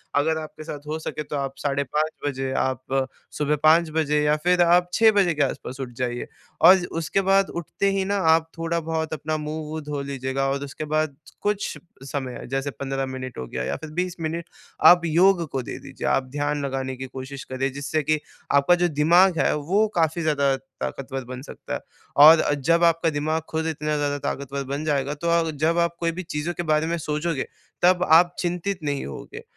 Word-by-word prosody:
अगर 160 +3 +2
आपके 155 0 -8
साथ 150 -1 -8
हो 155 +1 -3
सके 155 -1 -5
तो 150 - -6
आप 135 -1 -2
साढ़े 140 0 -1
5 155 +4 -1 0.2
बजे, 135 -1 -2
आप 130 +1 -1 0.3
सुबह 150 0 +1
5 160 +1 +5
बजे 150 -2 +2
या 150 0 +3
फिर 180 0 +3
आप 175 +1 +4
6 225 -1 +6 0.2
के 150 - -2
आस-पास 130 -1 -4
उठ 130 -2 -4
जाइए। 120 -1 -2 0.3
और 185 +4 +9
उसके 165 +4 0
बाद 195 0 +3
उठते 175 +4 -1
ही 195 -1 0
ना, 200 +1 0
आप 160 -3 +3
थोड़ा 165 0 -1
बहुत 160 -1 -3
अपना 155 0 -2
मुँह-वू, 155 +1 -5
धो 145 -1 -4
लीजिएगा 135 0 -2
और 140 +1 -2
उसके 145 +2 -6
बाद 155 -1 0 0.3
कुछ 205 -1 -1 0.3
समय 135 -2 -4
है, - - -8
जैसे 135 +2 -2
15 135 0 -3
मिनट 130 -1 -6
हो 65 - -4
गया 65 +1 -4
या - - -2
फिर 160 - -9
20 180 -1 -1
मिनट, 165 +1 -3 0.4
आप 175 0 +8
योग 175 +2 +4
को 135 - -1
दे - - -6
दीजिए। 135 -1 -6
आप 135 - +2
ध्यान 145 0 -1
लगाने 130 -1 -3
की 130 - -5
कोशिश 130 +1 -8
करें, 135 +1 -2
जिससे 145 +2 -2
कि 155 +2 +1 0.3
आपका 140 +5 +5
जो 175 0 +2
दिमाग़ 170 +4 +4
है, - - +2
वो 190 +9 +1
काफ़ी 165 0 +1
ज़्यादा 140 -4 +2 0.3
ताकतवर 135 -1 -4
बन 130 +1 -7
सकता - - -8
है। - - -2 0.4
और 155 +3 +10
अ, 145 - +1
जब 165 +5 +2
आपका 165 0 +3
दिमाग़ 155 +1 -1
खुद 160 0 -2
इतना 150 -1 -2
ज़्यादा 145 -1 0
ताकतवर 140 0 -3
बन 140 +3 -4
जाएगा। 145 -2 0
तो 170 +4 -3
आप 170 -1 +2
जब 165 +2 +3
आप 170 0 +1
कोई 165 -1 0
भी 185 +2 -6
चीज़ों 160 0 -3
के 175 - -4
बारे 155 +1 +2
में 170 - -1
सोचोगे, 150 -1 -2 0.4
तब 180 0 +4
आप 175 +2 +6
चिंतित 180 +2 -2
नहीं 145 -2 -2
होगे। 455 +3 -8
150 Hz, 205 wpm, -24 LUFS, 140-170 Hz, 0.4 s, और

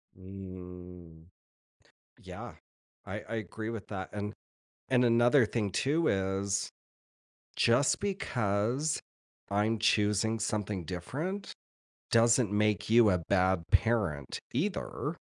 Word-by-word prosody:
Mm. 90 -3 -10 0.9
Yeah, - - -9 0.5
I - - -5
I 115 - -6
agree 110 0 -5
with 115 -4 -6
that, 95 -2 -5
and 105 0 -4 0.6
and 125 -1 +4
another 120 +2 +5
thing 105 -2 -2
too 155 - +1
is 95 0 0 0.8
just 120 +4 +3
because 125 - -1 0.5
I'm 105 +2 +1
choosing 105 +1 +2
something 105 -3 -2
different, 145 - -4 0.6
doesn't 115 -1 +4
make 105 0 +1
you 115 -2 +6
a 90 -2 +1
bad 95 -2 +2
parent 95 - +1
either. 165 +1 -2
105 Hz, 100 wpm, -31 LUFS, 95-120 Hz, 0.9 s, you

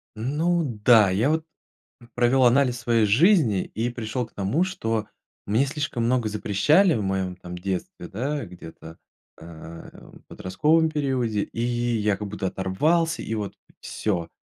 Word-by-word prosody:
Ну 160 +9 0 0.2
да, 110 -5 +7
я 110 +10 +1
вот 160 0 0 0.7
провёл 125 +1 +3
анализ 125 0 +3
своей 115 -2 +2
жизни, 125 - +4
и 115 +3 -3
пришёл 120 +1 -4
к - - -29
тому, 105 - 0
что 115 - -2 0.4
мне 115 +7 +2
слишком 135 -4 -3
много 120 -3 +1
запрещали 150 - +3
в 110 - -1
моем, 95 -1 -2
там, 90 0 -8
детстве, 100 - -5
да, 135 +5 -3
где-то, 80 -2 -12 0.4
а, 85 0 -10 0.2
в - - -16
подростковом 155 - +1
периоде, 130 -8 -1
и 115 - -6
я 120 -4 0
как 105 - -5
будто 100 -1 -3
оторвался 160 - 0
и - - -4
вот 105 -2 -4 0.3
всё. 90 -6 -3
115 Hz, 145 wpm, -24 LUFS, 100-140 Hz, 0.7 s, да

